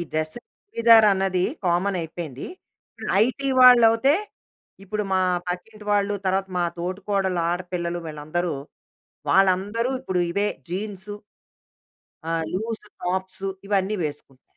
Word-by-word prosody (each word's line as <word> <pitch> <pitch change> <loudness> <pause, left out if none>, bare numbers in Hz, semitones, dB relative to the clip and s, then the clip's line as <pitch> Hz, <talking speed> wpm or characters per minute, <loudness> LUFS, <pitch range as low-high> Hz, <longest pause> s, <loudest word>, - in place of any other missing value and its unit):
ఈ - - -1
డ్రెస్, 155 0 -2 0.3
చుడిధార్ 230 - +6
అన్నది 190 -1 +1 0.2
కామన్ 185 +3 +1
అయిపోయింది. 160 -5 -6 0.8
ఐటీ 275 +2 -2
వాళ్ళవుతే, 245 +2 +7 0.7
ఇప్పుడు 210 +2 -2
మా 185 - +3 0.3
పక్కింటి 210 +4 -6
వాళ్ళు, 205 0 +2
తర్వాత 190 +1 +1
మా 175 - +2
తోటికోడళ్ళ 190 +1 -1
ఆడపిల్లలు 175 -1 -3
వీళ్ళందరూ 155 +3 -3 0.8
వాళ్ళందరూ 195 +5 +2
ఇప్పుడు 190 -9 -2
ఇవే 205 +3 +1 0.2
జీన్సు, 200 +2 -5 1.2
ఆహ్, 165 -1 0
లూజ్ 220 +4 -2 0.2
టాప్సు 190 +2 -2 0.2
ఇవన్నీ 200 +1 +1
వేసుకుంటారు. 140 -3 -8
190 Hz, 105 wpm, -24 LUFS, 175-210 Hz, 1.2 s, వాళ్ళవుతే